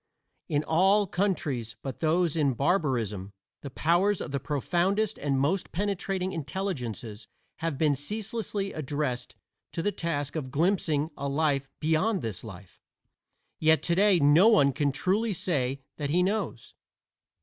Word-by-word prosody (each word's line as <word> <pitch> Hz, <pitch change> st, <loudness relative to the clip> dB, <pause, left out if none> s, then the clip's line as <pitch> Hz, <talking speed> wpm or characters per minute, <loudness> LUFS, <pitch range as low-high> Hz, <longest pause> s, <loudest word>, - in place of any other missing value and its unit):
In 150 Hz, -2 st, +1 dB
all 195 Hz, +6 st, +3 dB
countries 150 Hz, -, -1 dB
but 135 Hz, -2 st, -5 dB
those 165 Hz, 0 st, +2 dB
in 140 Hz, -5 st, +2 dB
barbarism 120 Hz, -, 0 dB, 0.3 s
the 140 Hz, -, -6 dB
powers 175 Hz, +8 st, +2 dB
of -, -, -5 dB
the 140 Hz, -, -1 dB
profoundest 180 Hz, -, 0 dB
and 140 Hz, -2 st, 0 dB
most 170 Hz, +8 st, 0 dB
penetrating 195 Hz, -1 st, -2 dB
intelligences 135 Hz, -, -4 dB, 0.3 s
have 160 Hz, -3 st, -2 dB
been 150 Hz, 0 st, +3 dB
ceaselessly 205 Hz, -, -3 dB
addressed 145 Hz, -4 st, -3 dB, 0.4 s
to 165 Hz, -, -2 dB
the 205 Hz, -, +1 dB
task 145 Hz, -6 st, -3 dB
of 145 Hz, -5 st, -3 dB
glimpsing 160 Hz, 0 st, +1 dB
a 140 Hz, 0 st, -3 dB
life 140 Hz, -2 st, 0 dB
beyond 175 Hz, +7 st, +1 dB
this 105 Hz, -6 st, -4 dB
life; 95 Hz, -3 st, -12 dB, 0.8 s
yet 160 Hz, 0 st, +4 dB
today 190 Hz, +2 st, +4 dB
no 150 Hz, +7 st, +6 dB
one 145 Hz, -12 st, +5 dB
can 140 Hz, +1 st, +1 dB
truly 205 Hz, +9 st, 0 dB
say 135 Hz, -7 st, -1 dB
that 145 Hz, -2 st, -3 dB
he 175 Hz, +4 st, +3 dB
knows. 195 Hz, -, -2 dB
155 Hz, 140 wpm, -28 LUFS, 140-190 Hz, 0.8 s, no